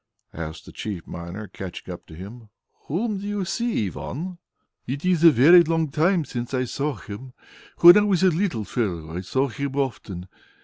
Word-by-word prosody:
asked 80 -1 -7
the - - -11
chief 100 -6 -6
miner, 85 +5 -7
catching 95 -1 -7 0.2
him 100 +8 -9
up. 110 - -20 0.4
"Whom 200 +6 -1
do 200 - -6
you 205 -2 -2
see, 230 - -1
Ivan?" 170 - -6 0.5
"It 140 +6 -4
is 180 -3 +2
a 170 - +10
very 160 +6 +7
long 165 -2 0
time 165 +2 +2
since 120 0 -4
I 130 - +1
saw 140 +3 -2
Him. 115 +5 -9 0.5
When 175 +1 +11
I - - +3
was 195 -3 +2
a 190 - +6
little 165 - -1
fellow, 85 -9 -3
I 90 - -3
saw 130 +9 0
him 140 +2 -4
often. 105 -9 -3
135 Hz, 180 wpm, -24 LUFS, 105-175 Hz, 0.5 s, When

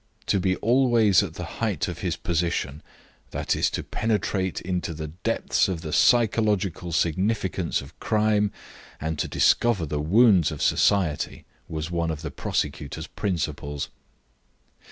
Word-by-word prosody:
To 100 - +2
be 95 0 +1
always 115 -5 +4
at - - -5
the - - -5 0.2
height - - 0
of - - -5
his - - -1
position, 85 -4 -2 0.5
i.e., - - -3
to - - 0
penetrate 105 -4 -1
into 90 -2 -3
the 75 0 -5
depths 100 +9 0
of 90 -4 -3
the 80 -3 -5
psychological 105 -7 +2
significance 95 +2 0
of 70 +3 -14
crime 105 -1 +2 0.5
and 80 0 -3
to - - 0
discover 115 -8 +2
the 75 0 -2
wounds 95 +1 +5
of 75 - -4
society, 85 -8 +1 0.2
was 80 +1 -4
one 85 -1 0
of 80 0 -4
the 80 - -4
prosecutor's 75 +2 -3
principles. 75 -8 -3
90 Hz, 135 wpm, -25 LUFS, 80-105 Hz, 0.5 s, wounds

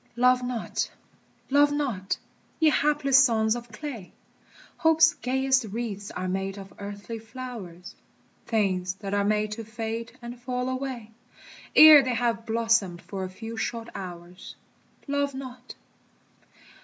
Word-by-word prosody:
Love 250 +1 +4
not, 245 -2 -3 0.6
love 290 +1 +5
not, 250 -11 -2 0.4
ye 315 -1 +5
hapless 285 -3 +4
sons 220 -3 +2
of 240 -1 -8
clay! 230 -5 -7 0.7
Hope's 320 0 +5
gayest 265 0 +1
wreaths 205 -2 -5
are 185 - -4
made 195 +1 -2
of 195 -1 -10
earthly 205 +3 -7
flowers, 220 -7 -9 0.5
Things 190 -4 0
that 195 0 -6
are 205 0 +2
made 210 +1 +1
to 225 +2 -5
fade 225 +1 -5
and 240 0 -9
fall 250 0 -2
away 255 -4 -4 0.6
Ere 310 -2 +11
they 255 -2 -1
have 230 -1 -1
blossomed 225 -6 +1
for 195 -2 -5
a 185 - -4
few 225 +4 -8
short 230 +1 -3
hours. 175 -1 -9 0.5
Love 285 -1 -1
not! 255 -2 -9
230 Hz, 130 wpm, -26 LUFS, 205-255 Hz, 0.7 s, Ere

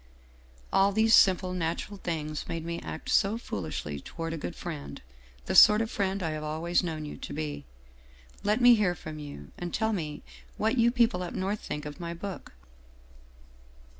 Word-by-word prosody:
All 195 +1 +5
these 220 +2 +3
simple 185 -2 +5
natural 175 +3 -3
things 155 -4 -3
made 165 -1 -4
me 170 0 -4
act - - -7
so 210 +2 +3
foolishly 75 - -4
toward 165 - -5
a - - -3
good 115 - -5
friend, 70 0 -6 0.5
the - - -2
sort 210 0 +9
of 225 0 -1
friend 195 -1 -1
I 160 - -1
have 155 0 -4
always 160 +3 0
known 160 -4 -4
you 150 - -7
to - - -8
be. 150 - -4 0.8
Let 210 +3 +1
me 245 0 +9
hear 205 -6 +2
from 155 -2 -8
you, 145 - -9
and 175 -1 -4
tell 220 0 0
me 155 -6 -4 0.3
what 225 +4 +1
you 235 +1 +5
people 235 -6 +2
up 180 - -5
North 195 +3 -1
think 150 0 -5
of 150 +3 -7
my 170 -1 -5
book. 195 +2 -7
170 Hz, 180 wpm, -29 LUFS, 155-205 Hz, 0.8 s, sort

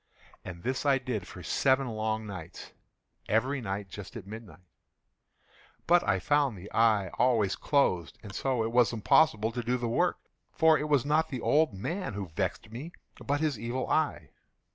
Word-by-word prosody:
And 85 -2 -9
this 130 +1 -1
I 140 -2 +4
did 125 -8 -4
for 90 - -10
seven 130 - +2
long 110 -1 -2
nights—every 105 - -5
night 100 -2 -4
just 105 +6 -10
at 110 -6 -7
midnight—but 110 - -5
I - - +2
found 145 -7 +1
the 95 +3 -11
eye 110 -4 +3
always 115 -6 +3
closed; 95 - +1
and 100 -3 -9
so 130 +1 0
it 115 - -2
was 120 -2 +3
impossible 110 -1 +3
to 120 +1 -3
do 125 +2 0
the 120 -1 -3
work; 115 - +1 0.3
for 160 0 +4
it 150 0 -2
was 140 -3 +3
not 155 +2 +2
the 130 -3 -4
old 150 -7 +2
man 160 - -4
who 100 -3 -5
vexed 95 +6 -3
me, 145 +10 -7 0.3
but 145 +1 -1
his 150 -8 0
Evil 120 +3 -3
Eye. 115 - 0
115 Hz, 165 wpm, -29 LUFS, 100-140 Hz, 0.3 s, I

